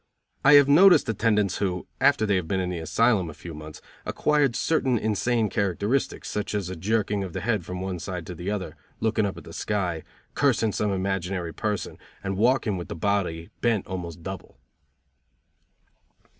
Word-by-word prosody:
I 135 - +7
have 145 -1 +8
noticed 175 +6 +7
attendants 105 -3 +1
who, 90 -3 -2
after 140 -6 +4
they 100 -2 +2
had 90 -3 -3
been 95 +3 0
in 90 -1 -1
the 90 - -3
asylum 100 +2 +2
a 75 - -9
few 80 +2 -9
months, 75 0 -10 0.2
acquired 145 -5 +1
certain 130 -6 +1
insane 110 +2 +1
characteristics, 100 - -1
such 105 0 -3
as 100 -3 -2
a - - -4
jerking 105 +2 0
of 90 -3 -6
the - - -3
head 110 -5 0
from 90 +2 -6
one 95 -2 -3
side 90 -1 -5
to 90 - -6
the 90 +3 -5
other, 105 -3 -3 0.2
looking 110 -2 +1
up 95 - -5
at - - -9
the - - -11
sky, 90 -6 -2 0.3
cursing 120 -6 +2
some 105 0 -1
imaginary 95 -2 -2
person, 105 -2 -3 0.2
and 95 -1 -2
walking 115 -1 +2
with 85 - -6
the - - -6
body 85 -2 -1
bent 115 -5 +1
almost 85 -3 -6
double. 95 +1 -7
100 Hz, 180 wpm, -26 LUFS, 90-110 Hz, 0.3 s, have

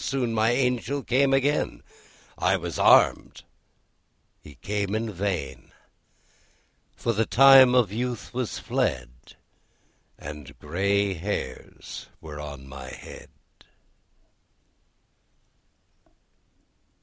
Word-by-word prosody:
Soon 125 -4 -1
my 110 0 +2
Angel 125 +2 0
came 135 +3 +2
again; 135 +2 0 0.5
I 95 +1 +1
was 85 -3 -6
armed, - - +4 1.0
he 75 - -14
came 100 0 -3
in 110 0 -2
vain; 85 -8 -4 1.2
For 115 - -1
the 110 +1 0
time 135 -1 +7
of 120 -6 +3
youth 120 +3 -4
was 125 -2 -3
fled, 60 +1 -3 0.8
And 75 -2 -10
grey 100 +5 0
hairs 85 -7 -6
were 75 -2 -9
on 70 -2 -9
my 65 -1 -9
head. - - -11
100 Hz, 90 wpm, -25 LUFS, 75-125 Hz, 1.2 s, time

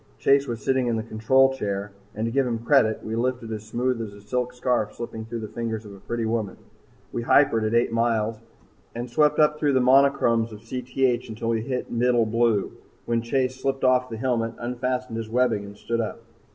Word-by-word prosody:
Chase 140 - +3
was 115 -3 -5
sitting 130 -2 +2
in 120 - +1
the 110 - -2
control 130 +4 +3
chair, 100 -4 -3 0.2
and 110 +1 -2
to 115 - -2
give 135 +1 +1
him 115 -2 -1
credit, 120 -7 +3
we 110 - -3
lifted 120 -1 -2
as 105 -1 -5
smooth 125 +1 -1
as 105 -3 -6
a - - -13
silk 125 +4 -2
scarf 125 -3 -1
slipping 115 -2 -6
through 115 0 -5
the 110 - -5
fingers 110 0 -4
of 100 - -10
a 100 - -12
pretty 115 +3 -3
woman. 110 -3 -2 0.5
We 120 - -3
hypered 115 -2 +4
at 110 - 0
eight 120 0 +3
miles 115 -1 0 0.6
and 120 +1 -4
swept 150 +2 +3
up 150 0 +3
through 145 -2 +2
the 130 - +4
monochromes 125 -3 +4
of 105 -1 -10
Cth 125 +1 -1
until 115 +1 -4
we 115 -1 +1
hit 125 +2 -4
middle 120 -1 +2
blue, 115 -2 +1 0.3
when 115 -1 0
Chase 130 +2 -1
slipped 135 0 -1
off 130 0 +3
the 115 - -5
helmet, 115 -2 -1
unfastened 125 0 -3
his 115 -1 -5
webbing, 120 -3 +1
and 100 0 -11
stood 115 +2 -2
up. 110 - -5
120 Hz, 210 wpm, -25 LUFS, 110-130 Hz, 0.6 s, hypered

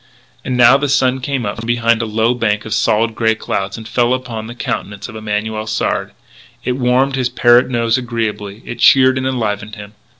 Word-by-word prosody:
And 125 - -2
now 125 +2 +7
the 145 0 -2
sun 130 -1 +2
came 135 -3 -2
out 100 - -4
from 115 0 -7
behind 115 -1 +2
a 115 - -3
low 110 +2 +1
bank 105 -3 -1
of 110 - -4
solid 110 +1 +1
grey 110 0 +1
cloud, 95 -3 -3
and 110 -1 -9
fell 120 +2 +1
upon 115 -4 -6
the 120 - -9
countenance 105 -4 -4
of 110 - -11
Emanuel 110 0 -3
Sard. 110 - -2 0.5
It - - -1
warmed 130 +2 +1
his 130 -2 0
parrot 120 0 +4
nose 115 -1 +1
agreeably; 110 -4 -4
it 120 - -7
cheered 130 +1 +5
and 130 - -2
enlivened 105 -4 -3
him. 105 0 -11
115 Hz, 200 wpm, -16 LUFS, 110-125 Hz, 0.5 s, now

